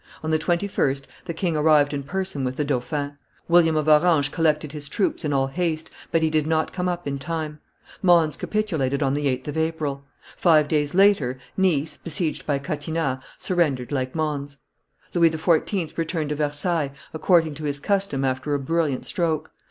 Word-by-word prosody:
On 160 - -1
the 155 - +2
21st, 170 -6 0 0.2
the 170 - -4
king 170 -1 -1
arrived 150 -1 +4
in 140 - -2
person 185 -1 -3
with 130 0 -2
the 150 - 0
dauphin; 145 +2 -2 0.3
William 170 -2 +5
of 155 0 0
Orange 155 -1 +4
collected 155 -2 +1
his 145 -1 -4
troops 195 0 0
in 150 - -1
all 135 -1 +2
haste, 160 +2 -2 0.2
but 165 -1 +1
he 160 - +2
did 155 -1 +1
not 160 0 0
come 180 0 -1
up 175 0 -3
in 140 -1 -3
time: 155 0 -4 0.4
Mons 170 -5 +4
capitulated 155 -11 -1
on 135 -1 +1
the 145 0 0
8th 130 +1 -2
of 150 - -4
April; 155 -4 -1 0.3
five 155 -4 +4
days 150 0 0
later, 190 -11 +4 0.2
Nice, 165 -6 +1
besieged 165 -1 -2
by 145 -2 +2
Catinat, 145 -1 -2 0.2
surrendered 150 -9 0
like 130 -1 -2
Mons; 145 -3 -2 0.6
Louis 170 -2 +5
XIV. 160 +2 0
returned 165 -2 -2
to 150 - -1
Versailles, 150 0 -1 0.2
according 160 -1 +3
to 155 +1 -7
his 145 -1 -1
custom 195 -6 0
after 130 +3 -1
a - - 0
brilliant 150 -1 -1
stroke. 165 -4 -1
155 Hz, 175 wpm, -24 LUFS, 145-165 Hz, 0.6 s, William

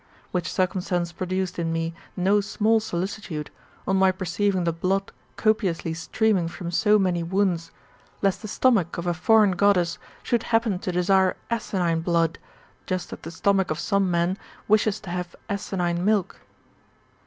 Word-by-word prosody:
Which 180 -2 -2
circumstance 180 -2 0
produced 185 +1 -3
in 165 -1 -1
me 165 0 -2 0.2
no 195 +3 +3
small 215 +2 +2
solicitude, 180 -5 -4 0.4
on 190 - +2
my 190 0 +5
perceiving 185 +1 0
the 170 -1 0
blood 190 +4 -1 0.2
copiously 190 -7 +1
streaming 185 +2 +1
from 170 +1 -6
so 210 +4 +4
many 180 -4 +1
wounds, 175 -1 0 0.5
lest 195 -2 +1
the 215 - -6
stomach 210 -6 +2
of 170 - -4
a 175 - +1
foreign 205 +3 +4
Goddess^^ 180 -2 +2 0.2
should 240 -2 +1
happen 225 -5 +2
to 180 - -3
desire 185 +1 +3
asinine 180 -7 0
blood, 165 -1 +1 0.5
just 185 -1 -3
as - - -8
the 165 - -7
stomach 190 +3 +1
of 155 - -1
some 195 +2 +1
men 175 +2 +1 0.3
wishes 215 0 +3
to 190 - -7
have 180 -1 -4
asinine 180 -3 -1
milk. 205 -2 +1
185 Hz, 155 wpm, -25 LUFS, 170-200 Hz, 0.5 s, my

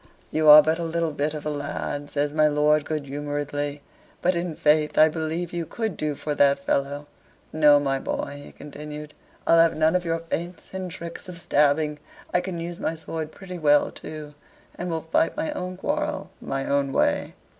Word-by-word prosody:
"You 155 -1 +3
are 150 0 +11
but 160 +2 +1
a - - -2
little 165 0 -1
bit 150 +1 -2
of 150 - -7
a 150 - -1
lad," 145 0 -4
says 145 0 -1
my 155 0 +4
lord, 150 0 +3
good 155 -2 -3
humoredly; 145 0 -3 0.4
"but, 180 - +2
in 170 -2 -3
faith, 150 0 +2
I 155 +1 +7
believe 160 +2 -3
you 170 -2 -3
could 220 0 -3
do 150 -1 -2
for 150 +1 -3
that 140 -1 +4
fellow. 140 +1 -1 0.5
No, 150 -2 +6
my 135 -1 0
boy," 145 +1 -4
he - - -12
continued, 150 +1 -9 0.3
"I'll 165 - +5
have 165 0 +5
none 155 +2 +3
of 180 - +1
your 165 -1 0
feints 170 +1 -5
and 190 -1 -4
tricks 170 +2 -8
of 180 - -7
stabbing: 150 -2 +2 0.3
I 180 - +3
can 180 -2 -5
use 170 +1 -5
my 160 - -1
sword 160 -1 -5
pretty 180 -1 -9
well 145 -2 +4
too, 150 -1 -9 0.4
and 175 - -5
will 165 -1 -2
fight 160 - +1
my 310 0 -1
own 185 -8 -5
quarrel - - -2
my 135 0 -3
own 140 -1 +1
way." - - +1
155 Hz, 195 wpm, -25 LUFS, 145-170 Hz, 0.5 s, are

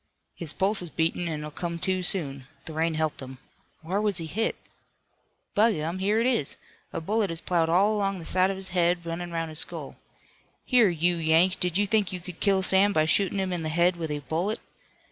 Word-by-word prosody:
"His 165 -4 -2
pulse 195 +4 0
is 175 - -7
beatin' 165 +2 -1
an' 155 -2 -3
he'll 150 0 -6
come 170 +2 -4
to 185 +2 -1
soon. 140 -8 0 0.2
The 160 - -7
rain 160 +1 0
helped 155 -1 -1
him. 130 0 -9 0.5
Whar 190 +6 -1
was 210 -3 +1
he 165 - +1
hit? 220 +8 -1 1.0
By 220 +2 +4
gum, 165 +2 -3
here 205 +3 +1
it 230 - +1
is! 240 - 0 0.3
A - - -3
bullet 205 +4 0
has 165 -1 -4
ploughed 170 -2 0
all 195 +5 +4
along 195 -2 0
the 165 - -8
side 185 +2 +3
of 195 - -2
his 190 0 -3
head, 175 -1 +1
runnin' 170 +1 -4
'roun' 165 -1 -2
his 155 0 -1
skull. - - -2 0.7
Here, 240 -6 +5
you 175 +1 +1
Yank, 165 +3 +3
did 180 0 0
you 205 - +3
think 210 -1 +1
you 185 - -4
could 180 -1 -9
kill 195 -2 +2
Sam 195 +2 +4
by 155 -3 +3
shootin' 195 +4 +1
him 190 -1 -1
in 175 - -2
the 155 - -2
head 175 +3 +3
with 165 -2 -4
a 145 -1 -3
bullet? 180 +7 -1
175 Hz, 220 wpm, -26 LUFS, 160-195 Hz, 1.0 s, Here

